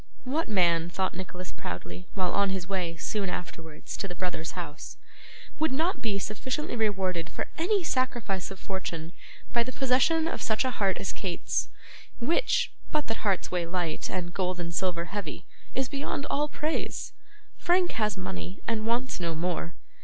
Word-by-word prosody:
'What 290 Hz, +4 st, 0 dB
man,' 170 Hz, -4 st, +4 dB
thought 185 Hz, +1 st, 0 dB
Nicholas 185 Hz, 0 st, -5 dB
proudly, 90 Hz, 0 st, -5 dB
while 185 Hz, -2 st, +2 dB
on 200 Hz, -1 st, +4 dB
his 190 Hz, -2 st, -1 dB
way, 180 Hz, -4 st, -1 dB
soon 195 Hz, +3 st, 0 dB
afterwards, 165 Hz, -3 st, -5 dB
to 195 Hz, -, -1 dB
the 180 Hz, -, -6 dB
brothers' 175 Hz, -3 st, -2 dB
house, 160 Hz, -4 st, -5 dB, 0.6 s
'would 315 Hz, -1 st, +3 dB
not 325 Hz, +8 st, +2 dB
be 210 Hz, -4 st, +1 dB
sufficiently 250 Hz, +9 st, -2 dB
rewarded 190 Hz, -6 st, +1 dB
for -, -, -2 dB
any 375 Hz, +3 st, +3 dB
sacrifice 240 Hz, -, +1 dB
of 195 Hz, -, -7 dB
fortune 170 Hz, -4 st, -3 dB, 0.4 s
by 235 Hz, -, +5 dB
the 245 Hz, +2 st, -1 dB
possession 270 Hz, +6 st, +4 dB
of -, -, -2 dB
such 220 Hz, +4 st, +2 dB
a 255 Hz, -, +2 dB
heart 195 Hz, -5 st, +2 dB
as 195 Hz, -, -1 dB
Kate's, 185 Hz, -3 st, 0 dB, 0.5 s
which, -, -, +3 dB, 0.2 s
but 305 Hz, -1 st, +2 dB
that 225 Hz, -, -1 dB
hearts 195 Hz, -4 st, +1 dB
weigh 175 Hz, -2 st, +1 dB
light, 170 Hz, -3 st, -1 dB
and 175 Hz, -2 st, -2 dB
gold 185 Hz, -1 st, 0 dB
and 170 Hz, -1 st, -2 dB
silver 175 Hz, -2 st, +1 dB
heavy, 185 Hz, -5 st, -4 dB, 0.3 s
is 265 Hz, 0 st, +2 dB
beyond 280 Hz, 0 st, -2 dB
all 295 Hz, +1 st, +3 dB
praise? 305 Hz, +2 st, -1 dB, 0.5 s
Frank 355 Hz, 0 st, +4 dB
has 215 Hz, -2 st, +1 dB
money, 185 Hz, 0 st, -4 dB
and 220 Hz, -1 st, +1 dB
wants 240 Hz, +1 st, +1 dB
no 170 Hz, -2 st, 0 dB
more. 170 Hz, 0 st, -1 dB
195 Hz, 170 wpm, -29 LUFS, 175-255 Hz, 0.6 s, by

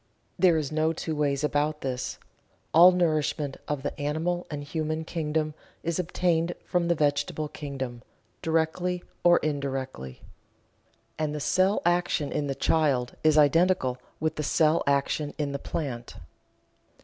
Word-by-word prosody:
There 175 Hz, -3 st, +5 dB
is 150 Hz, -2 st, -2 dB
no 155 Hz, +1 st, +1 dB
two 160 Hz, 0 st, -4 dB
ways 145 Hz, -1 st, 0 dB
about 150 Hz, +1 st, 0 dB
this 130 Hz, -1 st, -3 dB, 0.6 s
all 175 Hz, +4 st, +9 dB
nourishment 155 Hz, -5 st, 0 dB
of 145 Hz, -2 st, -2 dB
the -, -, -3 dB
animal 165 Hz, +4 st, -1 dB
and 145 Hz, -1 st, -5 dB
human 155 Hz, +1 st, -3 dB
kingdom 155 Hz, -2 st, -1 dB, 0.3 s
is 170 Hz, 0 st, -1 dB
obtained 175 Hz, -1 st, 0 dB
from 175 Hz, -1 st, 0 dB
the 170 Hz, -, +3 dB
vegetable 150 Hz, +1 st, 0 dB
kingdom, 135 Hz, -5 st, -6 dB, 0.4 s
directly 170 Hz, +2 st, 0 dB, 0.2 s
or 175 Hz, 0 st, +6 dB
indirectly. 135 Hz, -, -3 dB, 1.0 s
And 150 Hz, -1 st, -1 dB
the -, -, -3 dB
cell 185 Hz, +7 st, +2 dB
action 175 Hz, -4 st, +1 dB
in 145 Hz, -, -1 dB
the 135 Hz, -, -2 dB
child 135 Hz, -7 st, +1 dB
is 155 Hz, -1 st, +4 dB
identical 150 Hz, -3 st, +3 dB, 0.2 s
with 155 Hz, 0 st, -1 dB
the -, -, -1 dB
cell 155 Hz, +2 st, +3 dB
action 140 Hz, +1 st, 0 dB
in 145 Hz, -2 st, -1 dB
the 140 Hz, -, -3 dB
plant. 125 Hz, -7 st, -5 dB
155 Hz, 140 wpm, -27 LUFS, 145-165 Hz, 1.0 s, all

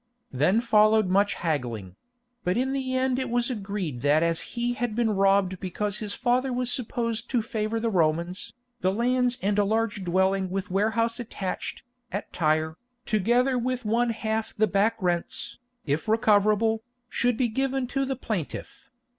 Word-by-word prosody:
Then 155 Hz, -, +3 dB
followed 215 Hz, -3 st, +4 dB
much 200 Hz, +2 st, +3 dB
haggling; 120 Hz, -, -3 dB, 0.5 s
but 180 Hz, +4 st, +1 dB
in 265 Hz, +2 st, 0 dB
the 260 Hz, -1 st, -2 dB
end 260 Hz, 0 st, +1 dB
it 260 Hz, -2 st, -2 dB
was 240 Hz, +1 st, +1 dB
agreed 195 Hz, -, -4 dB
that 150 Hz, +3 st, +3 dB
as 165 Hz, -1 st, +1 dB, 0.2 s
he 240 Hz, +1 st, +1 dB
had 245 Hz, -3 st, -2 dB
been 235 Hz, -2 st, +2 dB
robbed 195 Hz, -2 st, +2 dB
because 200 Hz, +2 st, -3 dB
his 210 Hz, -2 st, -4 dB
father 255 Hz, +1 st, +1 dB
was 245 Hz, 0 st, +1 dB
supposed 235 Hz, -2 st, -2 dB
to 240 Hz, -4 st, +1 dB
favour 220 Hz, 0 st, -2 dB
the 230 Hz, 0 st, 0 dB
Romans, 170 Hz, +1 st, 0 dB, 0.3 s
the 185 Hz, -, +2 dB
lands 245 Hz, +3 st, +1 dB
and 205 Hz, +1 st, +2 dB
a -, -, +5 dB
large 215 Hz, -1 st, 0 dB
dwelling 190 Hz, +1 st, +1 dB
with 195 Hz, +1 st, -3 dB
warehouse 230 Hz, +4 st, +1 dB
attached, 200 Hz, -5 st, -4 dB, 0.3 s
at 200 Hz, +1 st, -5 dB
Tyre, 155 Hz, 0 st, +1 dB, 0.3 s
together 240 Hz, +5 st, +2 dB
with 250 Hz, 0 st, -2 dB
one 235 Hz, +3 st, +2 dB
half 220 Hz, -1 st, -2 dB
the 215 Hz, -, +4 dB
back 210 Hz, +3 st, +2 dB
rents, 175 Hz, +2 st, -2 dB, 0.3 s
if 150 Hz, +4 st, -1 dB
recoverable, 215 Hz, 0 st, +3 dB, 0.3 s
should 245 Hz, -1 st, +1 dB
be 250 Hz, -, +2 dB
given 265 Hz, +3 st, -1 dB
to 275 Hz, +2 st, -1 dB
the 270 Hz, 0 st, -1 dB
plaintiff. 215 Hz, -, -5 dB
215 Hz, 165 wpm, -26 LUFS, 190-240 Hz, 0.5 s, a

